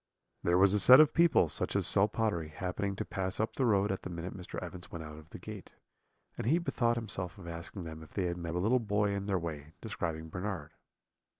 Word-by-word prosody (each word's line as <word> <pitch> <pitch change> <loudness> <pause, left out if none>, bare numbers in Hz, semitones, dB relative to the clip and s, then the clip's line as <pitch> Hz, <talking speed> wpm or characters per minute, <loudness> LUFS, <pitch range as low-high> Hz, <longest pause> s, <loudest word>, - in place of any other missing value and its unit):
"There 85 +1 +2
was 95 +1 +6
a 105 - +5
set 125 +6 +9
of 155 - +6
people, 170 - +4
such - - -3
as - - +3
sell 100 +1 +6
pottery, 105 -7 -2
happening 95 +4 -4
to - - -4
pass 95 -1 -2
up 110 +1 -1
the 130 - 0
road 100 -2 +2
at 95 - -3
the - - -7
minute 85 +1 -6
Mr. 90 -2 -8
Evans 90 -1 -9
went 85 -2 -6
out 75 0 -10
of 80 +1 -17
the - - -9
gate; - - -10 0.7
and - - -3
he 155 +7 +4
bethought 120 -9 0
himself 95 -6 -4
of 90 -3 -11
asking 85 +3 -6
them 80 -1 -8
if 80 - -14
they 95 - -2
had 85 0 -2
met 85 -1 -5
a - - 0
little 115 +7 +2
boy 105 -2 0
in 100 0 -3
their 100 -2 +1
way, 80 -3 -6
describing 80 -7 -5
Bernard. 90 +3 -5
95 Hz, 235 wpm, -31 LUFS, 85-105 Hz, 0.7 s, set